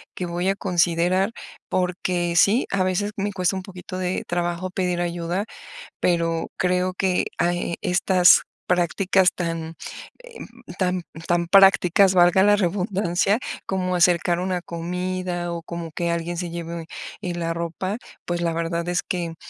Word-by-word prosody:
que 180 - -3
voy 175 +2 -1
a 195 - +1
considerar 180 +2 +1 0.4
porque, 180 -1 -1
sí, 215 +7 +4
a 195 -1 +2
veces 185 +3 0
me 205 0 -2
cuesta 185 0 0
un 190 - -4
poquito 185 -1 -8
de 185 0 -2
trabajo 175 +1 -2
pedir 180 -1 -1
ayuda. 175 +3 -2 0.6
Pero 165 -2 +1
creo 180 0 0
que 185 -1 +1
a 175 +1 +2
e 175 -1 -3
estas 180 0 +5 0.3
prácticas 180 +2 +2
tan, 165 -2 -4 0.5
eh, - - -13 0.4
tan 180 -1 0 0.2
tan 175 0 +1
prácticas, 195 0 +6
valga 175 +1 +5
la 205 - +6
redundancia, 195 +1 +1 0.3
como 185 -1 -1
acercar 175 0 +3
una 185 -1 -1
comida 180 +1 -3
o 170 -1 -5
como 170 -1 -6
que 170 +1 -1
alguien 170 +1 -3
se 175 0 -4
lleve, 170 -1 -6 0.4
eh, 180 -1 -3
la 165 -1 -2
ropa, 170 +5 -3 0.3
pues 175 0 -2
la 170 -1 +1
verdad 170 +1 -2
es 175 0 0
que 170 -2 -3
180 Hz, 150 wpm, -23 LUFS, 170-185 Hz, 0.6 s, prácticas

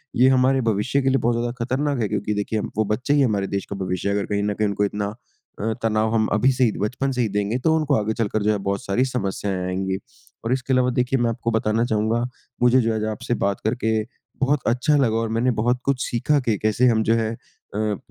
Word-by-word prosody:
ये 130 +2 +5
हमारे 130 0 +3
भविष्य 120 +7 0
के 135 - +2
लिए 135 - +3
बहुत 120 -1 +1
ज़्यादा 120 0 -1
खतरनाक 140 +2 -1
है 105 - +1
क्योंकि 105 0 -1
देखिए 105 +1 -1
हम - - -4
वो 110 - +2
बच्चे 135 +6 0
ही 145 - +4
हमारे 100 -6 +1
देश 100 -1 -3
का 100 - -4
भविष्य 90 +2 -2
हैं। 100 - +1
अगर 100 - 0
कहीं 100 0 0
न 105 0 0
कहीं 105 0 0
उनको 100 0 0
इतना 105 +1 -3 0.4
अ, 110 +2 -1
तनाव 110 0 +1
हम 110 -1 +2
अभी 125 +5 +4
से 130 - +1
ही 115 - +4
बचपन 125 +6 -1
से 125 -1 -1
ही 110 - +1
देंगे, 105 +4 0
तो 160 +5 +2
उनको 150 -3 +1
आगे 110 +1 0
चलकर 110 -1 -1
जो 105 - +3
है 105 - +1
बहुत 100 0 -1
सारी 120 +7 +1
समस्याएँ 100 -5 -2
आएँगी। 95 +1 -1 0.5
और 120 - +1
इसके 130 0 -1
अलावा 125 0 +3
देखिए, 125 +1 +1
मैं 120 -1 +2
आपको 115 0 -2
बताना 110 +1 +1
चाहूँगा, 110 0 +1 0.4
मुझे 125 +1 +5
जो 115 - 0
है - - -1
आज 110 - -2
आपसे 110 - -3
बात 100 0 0
करके 110 0 0 0.5
बहुत 140 +1 +2
अच्छा 125 +6 +2
लगा 115 -5 +2
और 115 -1 -1
मैंने 125 +2 +2
बहुत 125 +2 +1
कुछ 135 -1 +1
सीखा 145 +5 +1
कि 115 -6 0
कैसे 110 +4 +2
हम 110 -2 +3
जो 115 - +2
है 110 -1 0
अ 105 - -13
अ, 105 -2 0
115 Hz, 250 wpm, -23 LUFS, 105-125 Hz, 0.5 s, ये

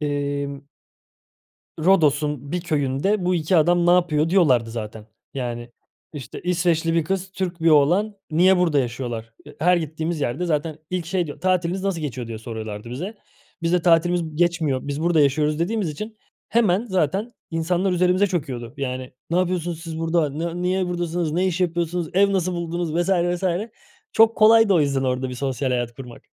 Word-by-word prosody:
emm 140 -1 -3 1.2
"Rodos'un 150 -5 +2
bir 180 - -1
köyünde 155 +5 0
bu 180 +1 +2
2 170 +2 +1
adam 175 +2 +3
ne - - +5
yapıyor?" 170 -3 +3
diyorlardı 130 -12 +3
zaten. 110 -1 -7 0.3
Yani, 120 -2 -4 0.4
işte, 140 -7 -8
"İsveçli 170 -2 +1
bir 165 -2 +2
kız, 190 +2 -2
Türk 180 -3 -4
bir 165 - +5
oğlan. 175 +9 +3 0.2
Niye 180 +4 +5
burada 165 -5 +2
yaşıyorlar?" 120 -3 -4
Eee, 150 - -14
her 180 +2 +4
gittiğimiz 160 0 -3
yerde 140 +7 -1
zaten 155 -1 -1
ilk 180 -2 -2
şey 175 0 -1
diyor, 145 - -9
"Tatiliniz 185 0 0
nasıl 195 -4 -1
geçiyor?" 130 -5 -4
diye 115 -1 -6
soruyorlardı 110 -1 -7
bize. 175 - -5 0.5
Biz 165 0 0
de 180 -1 +2
"Tatilimiz 165 -2 +2
geçmiyor, 165 -6 +1
biz 145 +2 -3
burada 170 -2 +3
yaşıyoruz." 150 +2 +2
dediğimiz 195 +2 -1
için 215 +9 -7 0.3
hemen 220 -3 +2
zaten 190 - -1 0.2
insanlar 175 +3 0
üzerimize 180 +2 +3
çöküyordu, 130 - -4
yani, 130 -2 -4 0.2
"Ne 170 - +1
yapıyorsunuz 175 -2 -1
siz 165 -1 -6
burada, 165 -2 +1
ne 170 +4 -4
niye 185 +1 0
buradasınız, 175 -2 -2
ne 180 +4 +1
iş 185 0 -1
yapıyorsunuz, 170 -1 -1
ev 200 +2 +4
nasıl 185 -2 0
buldunuz?" 170 -1 -3
vs. 175 +2 0
vs. 175 0 +1 0.7
Çok 225 0 +5
kolaydı 220 -1 +6
o 170 - +4
yüzden 140 -2 +1
orada 130 0 -1
bir 125 - -6
sosyal 135 +1 -2
hayat 120 -1 -1
kurmak. 125 -2 -11
165 Hz, 170 wpm, -22 LUFS, 140-180 Hz, 1.2 s, kolaydı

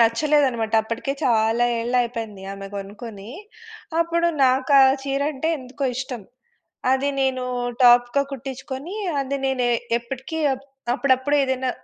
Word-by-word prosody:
నచ్చలేదనమాట. 235 -1 +2
అప్పటికే 230 +5 -3
చాలా 230 0 +3
ఏళ్ళయిపోయింది 230 -4 -2
ఆమె 195 0 -7
గొనుకొని. 205 +1 -8 0.7
అప్పుడు 335 0 +1 0.2
నాకు 260 +2 +2
ఆ - - +8 0.2
చీరంటే 280 +2 -1
ఎందుకో 260 +2 -6
ఇష్టం. 255 -4 -5 0.7
అది 275 +2 +1
నేనూ 255 -1 0 0.4
టాప్‌గా 245 +2 +6
కుట్టిచ్చుకొనీ, 270 - -6 0.2
అది 275 +1 -2
నేనే 250 -2 +1 0.3
ఎప్పటికీ 265 +6 -6
అప్ 270 +2 -14 0.3
అప్పుడప్పుడు 265 +1 +2
ఏదన్నా 260 -1 0
260 Hz, 110 wpm, -23 LUFS, 235-275 Hz, 0.7 s, ఆ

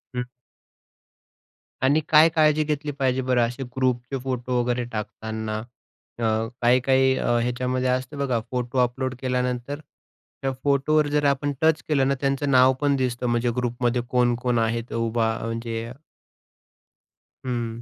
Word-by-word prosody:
हं. 125 0 -1 1.6
आणि 145 +4 +4
काय 155 +1 +7
काळजी 155 -1 +4
घेतली 150 0 -2
पाहिजे 130 -1 +1
बरं 125 -1 +2
असे 125 +3 -6
ग्रुपचे 130 0 0
फोटो 125 -1 -1
वगैरे 120 0 -1
टाकताना? 110 0 -4 0.6
अ, - - -3 0.4
काही-काही 130 +2 +4
अ, - - -2
ह्याच्यामध्ये 125 +1 -1
असतं 130 +3 -2
बघा, 135 -4 0
फोटो 125 0 -3
अपलोड 130 +1 -2
केल्यानंतर 125 +1 -2 0.6
त्या 135 - 0
फोटोवर 145 +2 +2
जर 145 0 +1
आपण 140 +1 +1
टच 160 0 +3
केलं 140 -4 +2
ना, 140 - +1
त्यांचं 140 0 0
नाव 130 0 +6
पण 145 -1 +3
दिसतं 125 -2 -1
म्हणजे 120 0 +1
ग्रुपमध्ये 125 0 0
कोण-कोण 125 -1 +1
आहेत 115 +1 -1
उभा 115 -1 0
म्हणजे 115 0 -4 1.5
हं. 120 -2 -3
125 Hz, 130 wpm, -24 LUFS, 120-135 Hz, 1.6 s, काय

